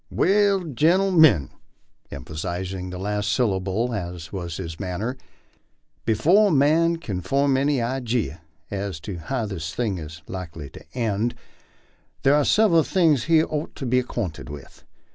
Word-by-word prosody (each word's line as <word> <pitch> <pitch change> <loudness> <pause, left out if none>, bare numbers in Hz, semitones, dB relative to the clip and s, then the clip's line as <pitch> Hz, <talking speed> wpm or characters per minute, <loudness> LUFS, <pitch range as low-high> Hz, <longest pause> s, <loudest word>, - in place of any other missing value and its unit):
"Well, 200 0 +3
gentlemen," 160 - +4 0.6
emphasizing 90 +7 -5
the 90 - -6
last 105 +2 -1
syllable 105 +1 0
as 85 -4 -5
was 85 -3 -4
his 85 -4 -6
manner, 100 +6 -3 0.9
"be 110 - +2
fore 185 - +5
a - - +1
man 160 +4 +3
kin 105 - -4
form 135 +8 +2
any 140 +2 +2
ijee 120 -7 -1 0.3
as 100 -4 -3
to 90 +3 -6
how 120 +8 -2
this 85 -6 -5
thing 105 -7 -1
is 80 0 -9
likely 80 -6 -7
to - - -12
end, 115 0 0 0.9
thar 135 - +5
are 145 -1 +3
sev 215 -2 +4
eral 165 -1 +5
things 160 -9 +3
he 160 -1 +4
ort 150 -1 -4
to 135 - -5
be 125 +1 +3
acquainted 110 -12 -4
with. 70 -2 -11
110 Hz, 150 wpm, -24 LUFS, 90-145 Hz, 0.9 s, fore